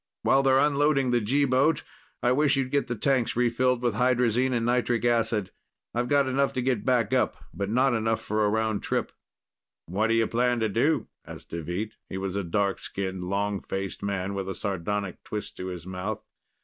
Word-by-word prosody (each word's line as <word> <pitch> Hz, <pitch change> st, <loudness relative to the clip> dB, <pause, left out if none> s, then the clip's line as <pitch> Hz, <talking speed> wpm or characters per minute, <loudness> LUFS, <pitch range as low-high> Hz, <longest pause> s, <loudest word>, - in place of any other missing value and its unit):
While 135 Hz, -, +4 dB
they're 135 Hz, -1 st, +4 dB
unloading 145 Hz, -2 st, +3 dB
the 120 Hz, -1 st, +2 dB
G 140 Hz, +7 st, +2 dB
boat, 140 Hz, +4 st, +2 dB, 0.4 s
I 120 Hz, -, +4 dB
wish 145 Hz, +2 st, +3 dB
you'd 135 Hz, -1 st, -1 dB
get 140 Hz, -1 st, +1 dB
the 120 Hz, -, -2 dB
tanks 130 Hz, +1 st, +1 dB
refilled 125 Hz, +1 st, +1 dB
with 120 Hz, -3 st, +2 dB
hydrazine 125 Hz, +2 st, +2 dB
and 120 Hz, -2 st, 0 dB
nitric 120 Hz, -1 st, +1 dB
acid. 115 Hz, -4 st, +1 dB, 0.4 s
I've 120 Hz, +1 st, 0 dB
got 140 Hz, 0 st, +3 dB
enough 135 Hz, +1 st, +1 dB
to 130 Hz, -, -1 dB
get 125 Hz, -4 st, 0 dB
back 125 Hz, -5 st, +2 dB
up, -, -, +2 dB, 0.2 s
but 100 Hz, 0 st, -3 dB
not 130 Hz, +3 st, +3 dB
enough 115 Hz, -1 st, +1 dB
for 105 Hz, +1 st, -1 dB
a 105 Hz, -, +3 dB
round 110 Hz, -1 st, 0 dB
trip." -, -, -1 dB, 0.7 s
"What 100 Hz, +6 st, 0 dB
do 115 Hz, -, +2 dB
you 115 Hz, 0 st, +3 dB
plan 120 Hz, +2 st, +1 dB
to 110 Hz, -, +1 dB
do?" 125 Hz, +10 st, +1 dB, 0.2 s
asked -, -, -11 dB
Deveet. 85 Hz, +6 st, -4 dB
He -, -, -4 dB
was 95 Hz, 0 st, -3 dB
a 100 Hz, -, -1 dB
dark 100 Hz, +3 st, 0 dB
skinned, 95 Hz, -2 st, -4 dB
long 100 Hz, +1 st, -1 dB
faced 95 Hz, 0 st, -4 dB
man 100 Hz, -1 st, -2 dB
with 95 Hz, -1 st, -3 dB
a 95 Hz, -, -4 dB
sardonic 100 Hz, -1 st, -3 dB
twist 105 Hz, -1 st, -6 dB
to 90 Hz, -, -5 dB
his 90 Hz, -2 st, -6 dB
mouth. 95 Hz, +4 st, -4 dB
115 Hz, 200 wpm, -27 LUFS, 100-130 Hz, 0.7 s, While